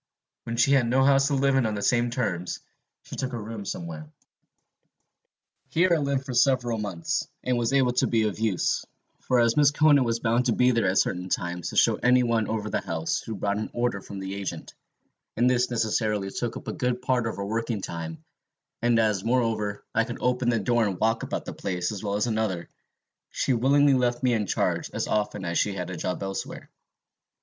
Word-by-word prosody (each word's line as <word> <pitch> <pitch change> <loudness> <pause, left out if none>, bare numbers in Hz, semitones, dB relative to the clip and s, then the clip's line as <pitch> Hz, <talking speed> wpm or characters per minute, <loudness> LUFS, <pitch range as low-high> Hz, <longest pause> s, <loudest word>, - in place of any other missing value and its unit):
When 115 0 -4
she 120 +4 +4
had 135 -4 +4
no 130 +3 +3
house 135 0 +4
to 140 - +1
live 135 0 +2
in 130 -4 +3
on 110 - -2
the 100 - -4
same 120 -1 +2
terms, 95 -8 -2 0.4
she - - -9
took 130 -1 -3
a 120 - -3
room 110 -1 -7
somewhere. 80 -4 -6 1.6
"Here 175 +2 +2
I - - +4
lived 140 -2 -1
for 130 - -5
several 120 -2 +2
months, 95 -5 -2 0.2
and 125 0 +1
was 120 0 0
able 130 -3 +3
to 125 - +2
be 115 -2 +2
of 105 -3 -2
use; 110 -5 0 0.4
for 125 - +1
as 115 -1 +4
Mrs. 145 +1 +4
Conan 145 -3 +5
was 115 -1 0
bound 115 +2 +1
to 120 - +3
be 125 +2 +4
there 115 -4 +1
at 95 +1 +1
certain 90 +1 0
times 90 -1 -2
to - - -8
show - - +4
any 125 0 +4
one 115 -2 +1
over 110 -1 -2
the - - -1
house 80 0 -2
who 110 - -6
brought 100 +1 -1
an 110 - -4
order 120 -4 -1
from 100 - -9
the 95 0 -5
agent, 100 -1 -6 0.6
and 120 +2 +3
this 125 0 +2
necessarily 110 -4 0
took 120 +4 -3
up - - -11
a - - -2
good 125 0 -2
part 125 -2 +1
of 115 - -3
her 100 - -4
working 115 +1 -2
time; 80 -1 -6 0.6
and 120 0 +3
as, 105 -4 +2
moreover, 110 -4 0
I 115 - +3
could 120 - -6
open 125 -1 +1
the 115 - +2
door 120 +3 +2
and 100 -4 -2
walk 115 +1 +1
about - - -4
the - - -6
place 90 -1 -3
as 105 -1 -6
well 100 -1 -1
as 105 - +1
another, 110 -7 -2 0.6
she 130 - 0
willingly 140 +4 +4
left 125 -1 +1
me 125 -1 +3
in 105 -3 0
charge - - 0
as - - -1
often 105 -2 -1
as 85 0 0
she 105 - +1
had 90 -1 -4
a - - -4
job 90 +3 -3
elsewhere. 95 0 -6
115 Hz, 215 wpm, -26 LUFS, 100-125 Hz, 1.6 s, Conan